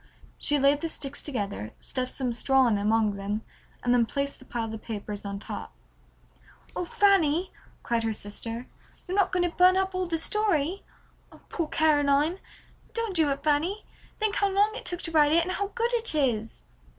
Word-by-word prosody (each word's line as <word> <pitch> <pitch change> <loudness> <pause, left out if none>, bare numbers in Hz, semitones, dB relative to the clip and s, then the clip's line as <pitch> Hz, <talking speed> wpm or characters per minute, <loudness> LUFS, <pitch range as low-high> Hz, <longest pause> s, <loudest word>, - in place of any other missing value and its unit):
She 295 - +3
laid 280 +1 +3
the 330 - -2
sticks 285 -2 -2
together, 200 - -4
stuffed 255 -1 -2
some 250 -3 -1
straw 265 +2 +3
in 220 -4 +2
among 210 0 +1
them, 205 +2 -3 0.4
and 245 - +3
then 235 -2 +3
placed 280 +3 -3
the 260 - -15
pile 225 -3 -4
of 220 - -7
papers 210 -2 -6
on 200 0 -4
top. 200 - -7 1.0
"Oh, 360 - -2
Fanny," 370 -3 +3 0.3
cried 235 -1 0
her 225 0 -1
sister, 225 +3 -4 0.4
"you're 365 - -2
not 390 -2 +3
going 360 -1 +2
to 340 - -8
burn 365 +1 +6
up 380 0 0
all 370 -1 -1
the 330 -1 -1
story? 375 -1 +1 0.5
Oh, - - -17
poor 335 -3 -2
Caroline! 300 +2 +2 0.6
Don't 460 -4 -2
do 315 -3 +4
it, 275 0 -2
Fanny; 315 +8 0 0.3
think 430 -1 0
how 400 - +2
long 405 +2 +2
it - - -7
took 350 0 -1
to 330 - -3
write 300 -2 +4
it 335 +1 +5
and 365 - -3
how 400 +2 -1
good 475 +1 0
it 460 -7 +1
is!" 230 -7 -1
295 Hz, 190 wpm, -27 LUFS, 235-370 Hz, 1.0 s, burn